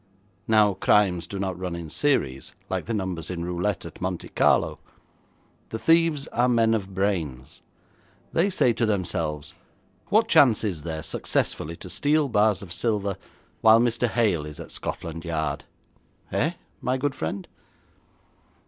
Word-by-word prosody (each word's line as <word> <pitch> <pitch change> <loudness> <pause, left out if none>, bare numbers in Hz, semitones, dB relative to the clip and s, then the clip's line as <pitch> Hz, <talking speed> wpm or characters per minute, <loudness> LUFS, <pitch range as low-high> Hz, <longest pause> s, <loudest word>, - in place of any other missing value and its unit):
Now 105 -2 +5
crimes 90 -3 +2
do 100 - -6
not 95 -2 -3
run 90 -2 -3
in 85 -1 -6
series, 70 - 0 0.2
like - - -1
the 115 - -1
numbers 90 -5 -3
in 85 -2 -3
roulette 90 +2 -2
at 85 - -10
Monte 90 -2 -3
Carlo. - - +2 0.9
The 110 - -3
thieves 165 0 +3
are 125 +1 +2
men 115 -2 +3
of 100 -3 -3
brains. 85 -10 -2 0.7
They 175 +5 +3
say 125 -10 +3
to 115 0 0
themselves, 85 -7 -2 0.5
"What 220 - +3
chance 125 - +5
is 95 -8 -2
there 80 -1 -5
successfully 80 +2 -2
to 90 - -10
steal 150 0 +2
bars 105 -4 +2
of 90 -3 -4
silver 100 +1 -1 0.5
while 110 0 +7
Mr. 120 0 +2
Hale 105 -8 +1
is 75 - -9
at - - -9
Scotland 80 0 -5
Yard?" 80 -3 -2 0.7
Eh, - - +1 0.3
my 130 +1 0
good 140 +1 -1
friend?' 90 +1 -4
100 Hz, 150 wpm, -25 LUFS, 85-115 Hz, 0.9 s, while